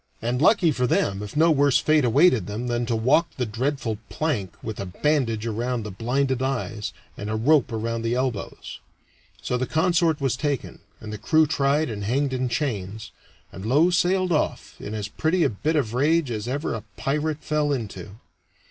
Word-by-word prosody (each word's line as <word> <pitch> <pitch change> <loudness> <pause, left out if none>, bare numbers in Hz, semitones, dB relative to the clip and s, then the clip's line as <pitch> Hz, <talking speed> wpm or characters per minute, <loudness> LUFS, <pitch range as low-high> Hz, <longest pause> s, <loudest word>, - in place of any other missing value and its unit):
And 120 +3 -1
lucky 175 -2 +5
for 125 -3 0
them 100 -3 +1
if 105 +7 -6
no 165 +2 +5
worse 145 -3 +4
fate 155 -1 +3
awaited 125 - +4
them 105 +4 -4
than 120 -1 -1
to 115 - 0
walk 130 +9 +3
the 125 - 0
dreadful 115 -1 -2
plank 115 - -2
with 110 -2 -5
a 100 - -3
bandage 115 0 0
around 115 +1 -2
the 105 - -6
blinded 130 +5 0
eyes 120 -5 -2 0.3
and 105 - -5
a 110 - -1
rope 130 +3 +3
around 115 +1 -2
the 115 +1 0
elbows. 125 -5 -3 0.6
So 125 - -1
the 130 - -1
consort 165 -1 +2
was 135 -3 0
taken, 145 -1 -3 0.2
and 110 -1 -8
the 105 - -6
crew 155 +8 +4
tried 145 0 +1
and 105 -2 -5
hanged 130 +6 0
in 130 -1 -1
chains, 110 -5 -3 0.4
and 95 - -9
Low 145 - +3
sailed 180 +1 +2
off 155 - -1
in 105 - -6
as 105 -1 -3
pretty 160 +10 0
a - - +3
bit 150 +10 -1
of 125 -7 0
rage 145 +2 +2
as 110 0 -4
ever 140 +5 -2
a - - -4 0.2
pirate 150 +2 -1
fell 150 -1 0
into. 110 -5 -5
125 Hz, 190 wpm, -24 LUFS, 110-150 Hz, 0.6 s, lucky